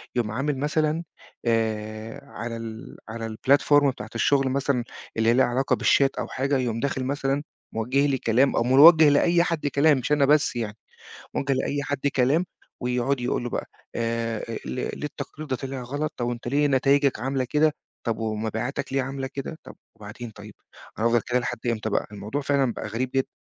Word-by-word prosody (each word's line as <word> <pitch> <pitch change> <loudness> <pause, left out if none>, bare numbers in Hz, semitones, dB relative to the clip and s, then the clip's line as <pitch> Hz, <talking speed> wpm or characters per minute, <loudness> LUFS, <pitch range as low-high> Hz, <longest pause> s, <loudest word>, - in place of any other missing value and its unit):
يقوم 115 -3 0
عامل 140 +4 -1
مثلًا 155 +3 0 0.4
آآ، 110 -1 -1
على 115 -4 -6
ال 115 0 -8
على 115 0 -5
الplatform 145 +3 +4
بتاعة 110 -4 -6
الشغل 135 +2 +2
مثلًا 135 -2 0 0.3
اللي 115 0 +3
هي 115 - +5
ليها 130 - +4
علاقة 130 +3 +1
بالchat 135 -1 +5
أو - - -2
حاجة 135 +2 0
يقوم 120 -3 -1
داخل 135 0 -1
مثلًا 140 +1 -1 0.3
موجّه 130 +6 +1
لي 135 -2 +1
كلام 125 +4 +2
أو - - +2
موجّه 150 +5 +8
لأي 170 +4 +4
حد 165 -4 -1
كلام 145 +1 +4
مش 130 +3 -3
أنا 145 -2 +4
بس 145 -2 +3
يعني، 110 -2 -3 0.6
موجّه 135 0 0
لأي 140 +2 -1
حد 145 0 -3
كلام، 140 +7 +3 0.4
ويقعد 125 +2 0
يقول 120 0 -1
له 120 - -3
بقى - - -3 0.3
آآ، 115 -1 -1
آآ، - - -4
"لي 65 - -3
ليه - - -8
التقرير 155 +1 -7
ده 130 - 0
طلع 135 0 -5
غلط؟ 145 +5 -3
طَب 120 - -2
وأنت 120 0 -4
ليه 145 +3 +2
نتايجك 140 0 +3
عاملة 135 0 -1
كده؟ 150 +4 +2 0.3
طَب 115 -1 0
ومبيعاتك 110 +4 -3
ليه 135 -1 +1
عاملة 135 0 -4
كده؟" 140 +3 -5
طَب - - -12 0.2
وبعدين 110 +2 -9
طيب، 105 0 -12 0.4
أنا 115 - +1
هافضل 120 0 +4
كده 125 0 +2
لحد 125 -1 -3
إمتى 110 -2 -1
بقى؟ - - 0
الموضوع 105 +8 -4
فعلًا 140 -3 +1
بقى 110 - -6
غريب 120 +4 -2
جدًا. 135 - +2
130 Hz, 190 wpm, -25 LUFS, 115-140 Hz, 0.6 s, موجّه